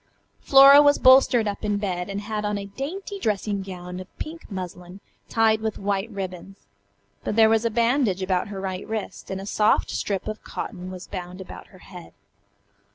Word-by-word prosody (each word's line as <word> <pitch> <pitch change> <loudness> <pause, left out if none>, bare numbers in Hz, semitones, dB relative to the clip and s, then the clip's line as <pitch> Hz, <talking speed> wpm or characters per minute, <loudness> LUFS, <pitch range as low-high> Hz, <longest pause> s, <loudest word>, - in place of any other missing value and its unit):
Flora 275 +1 +8
was 290 0 +5
bolstered 255 -3 +5
up 205 +1 -4
in 205 -1 0
bed, 185 -3 -3
and 200 +1 -4
had 210 0 -4
on 210 0 -1
a 200 - -5
dainty 340 - -6
dressing 210 - -1
gown 180 -1 -8
of 185 - -9
pink 325 +1 -8
muslin 180 -1 -7 0.3
tied 220 -1 +2
with 220 -1 -3
white 200 +2 -2
ribbons. 195 -1 -8 0.6
But - - -2
there 220 -1 +6
was 225 +1 +2
a - - +3
bandage 230 -4 +1
about 185 -1 0
her 200 -1 -6
right 190 -1 -5
wrist, 220 -1 -5
and 190 - -4
a 195 - -7
soft 210 +1 +2
strip 195 -1 -3
of 215 0 -6
cotton 185 -4 -6
was 185 0 -8
bound 180 -1 -7
about 190 - -10
her 185 - -18
head. 180 -3 -12
205 Hz, 185 wpm, -24 LUFS, 185-225 Hz, 0.6 s, Flora